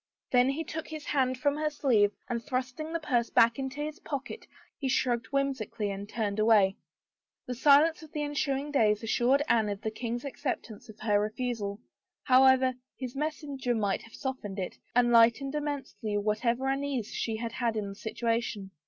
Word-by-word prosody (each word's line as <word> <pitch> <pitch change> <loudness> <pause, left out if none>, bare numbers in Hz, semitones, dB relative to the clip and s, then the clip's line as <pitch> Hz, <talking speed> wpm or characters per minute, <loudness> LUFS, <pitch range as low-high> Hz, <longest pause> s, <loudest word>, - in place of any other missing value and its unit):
Then 250 +1 +5
he 295 +4 -1
took 320 0 -6
his 310 -2 -7
hand 260 -3 +1
from 285 +3 +1
her 305 0 0
sleeve 235 -9 +3 0.2
and 235 -1 -3
thrusting 260 +3 -3
the 335 - -1
purse 245 -6 0
back 230 +2 +4
into 270 +2 -4
his 305 +3 -4
pocket 280 - -6 0.3
he 270 - -1
shrugged 245 -2 +1
whimsically 255 -6 -1
and 200 +1 -6
turned 215 -2 -2
away. 210 -3 +4 0.7
The 250 - -3
silence 290 +6 +5
of 315 -1 -13
the 300 -2 -2
ensuing 290 -1 -1
days 215 -6 +3
assured 245 +5 +2
Anne 220 -3 +3
of 200 -1 -4
the 220 - -2
king's 240 +3 -4
acceptance 255 -6 -5
of 215 - -12
her 210 -2 +3
refusal, 215 -1 -3 0.4
however 260 0 +5 0.2
his 255 -1 -6
messenger 285 -4 -2
might 205 -3 0
have 230 - -14
softened 255 -7 -5
it, 185 -2 -4 0.2
and 240 -1 +4
lightened 235 +4 +5
immensely 275 -8 -3
what 210 +2 -1
ever 240 +3 +1
uneasiness 270 -4 -2
she 225 - -2
had 230 0 -2
in 210 -1 -2
the - - -6
situation. 225 -2 -2
250 Hz, 175 wpm, -29 LUFS, 220-280 Hz, 0.7 s, Then